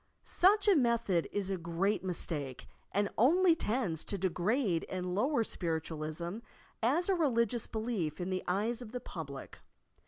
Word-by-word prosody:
Such 410 +4 +4
a 405 - +7
method 235 - +2
is 195 -1 -2
a 190 - 0
great 170 +4 0
mistake 155 -7 -4 0.2
and 205 +1 +1
only 335 - +5
tends 210 - -1
to 200 - -2
degrade 190 +1 +1
and 180 -1 -3
lower 245 +5 +2
Spiritualism 165 +1 -3 0.4
as 285 +10 +2
a 390 - +3
religious 240 - +1
belief 215 -9 -2
in 180 +1 -3
the 185 - -1
eyes 215 +7 0
of 235 -1 -9
the 250 - -2
pub 160 - -7
lic. 140 -1 -9
200 Hz, 155 wpm, -32 LUFS, 170-240 Hz, 0.4 s, a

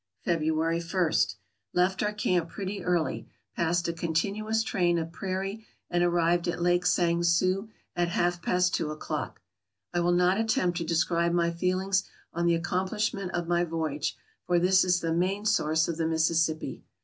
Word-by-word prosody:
February 165 0 +1
I. 170 -1 0 0.4
— - - -51
Left 185 +1 +2
our 210 - +1
camp 180 -5 0
pretty 200 +1 -5
early. 175 -3 -1 0.3
Passed 170 +1 +1
a 170 - -1
continuous 200 +7 -1
train 175 -6 +1
of 165 0 -3
prairie, 195 +4 -4 0.3
and 175 0 +2
arrived 175 0 +2
at 175 - -2
Lake 175 +1 +2
Sang 170 -1 +2
Sue 185 +5 +1 0.3
at 175 0 +1
half 175 0 0
past 180 +1 +1
two 155 - 0
o'clock. 155 0 -5 0.5
I 175 - +1
will 175 +1 +2
not 180 +3 +3
attempt 180 -6 +1
to - - -2
describe 170 +1 +1
my 170 -1 +2
feelings 185 +3 0 0.3
on 170 0 0
the 170 - +4
accomplishment 185 +2 -2
of 175 -1 -2
my 175 0 +2
voyage, 160 -3 -2 0.3
for 175 - +3
this 185 +2 +4
is 180 -1 +2
the 165 -1 -1
main 190 +5 0
source 160 -6 +2
of 165 - -3
the 165 -1 0
Mississippi. 160 0 0
175 Hz, 170 wpm, -28 LUFS, 170-185 Hz, 0.5 s, the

